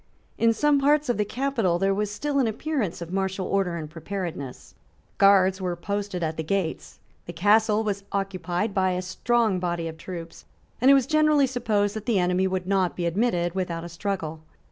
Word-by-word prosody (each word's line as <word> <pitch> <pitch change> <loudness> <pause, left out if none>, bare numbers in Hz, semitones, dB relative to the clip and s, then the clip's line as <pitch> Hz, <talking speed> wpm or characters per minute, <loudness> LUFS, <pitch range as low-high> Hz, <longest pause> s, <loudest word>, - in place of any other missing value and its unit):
In 230 0 +4
some 285 +5 +2
parts 295 0 +2
of 245 - +1
the 210 - +1
capital 235 -8 0
there 195 +2 +1
was 210 +1 -1
still 280 +7 -1
an 255 - +3
appearance 225 - -2
of 170 +2 -9
martial 190 -1 -1
order 195 -3 0
and 160 -2 -5
preparedness. 165 -4 -6 0.5
Guards 195 -1 +5
were 180 -1 -1
posted 200 0 -3
at 160 0 -2
the 160 - -2
gates: 180 0 -3 0.3
the 175 - -6
Castle 210 +4 +3
was 200 -2 -2
occupied 195 0 -2
by 185 -1 +2
a 180 - -2
strong 220 +1 +1
body 170 -2 -2
of 160 0 -8
troops; 170 -1 -8 0.4
and 255 - +5
it 275 - +8
was 270 -3 +3
generally 305 -1 +4
supposed 220 -5 0
that 215 -1 -6
the 230 -4 +2
enemy 180 +1 +2
would 185 -1 -2
not 190 -2 +1
be 175 - -2
admitted 175 -2 0
without 175 -3 -3
a 170 - -7
struggle. 170 -3 -4
195 Hz, 190 wpm, -25 LUFS, 175-220 Hz, 0.5 s, it